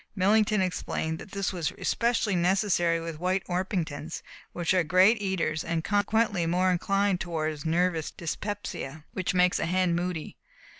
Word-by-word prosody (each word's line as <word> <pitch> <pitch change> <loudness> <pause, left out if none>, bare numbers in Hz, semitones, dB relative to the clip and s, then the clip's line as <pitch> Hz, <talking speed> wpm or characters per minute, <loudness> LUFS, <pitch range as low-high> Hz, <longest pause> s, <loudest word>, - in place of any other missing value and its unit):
Millington 210 +2 +3
explained 160 -3 -2
that - - -10
this 195 0 -2
was 170 -4 -1
especially 230 -4 +1
necessary 175 -2 +2
with 165 -2 -6
White 185 +2 0
Orpingtons, 175 -4 -3 0.3
which 175 +1 0
are 185 -2 +3
great 185 +7 +4
eaters 170 -5 -1
and 165 -1 -2
consequently 205 -3 +1
more 180 +2 +2
inclined 195 +1 +1
toward 155 -3 -3
nervous 165 -1 +1
dyspepsia, 170 -4 -5
which 185 0 -2
makes 180 0 +3
a - - -1
hen 180 0 +2
moody. 175 -2 -3
180 Hz, 145 wpm, -27 LUFS, 165-195 Hz, 0.3 s, great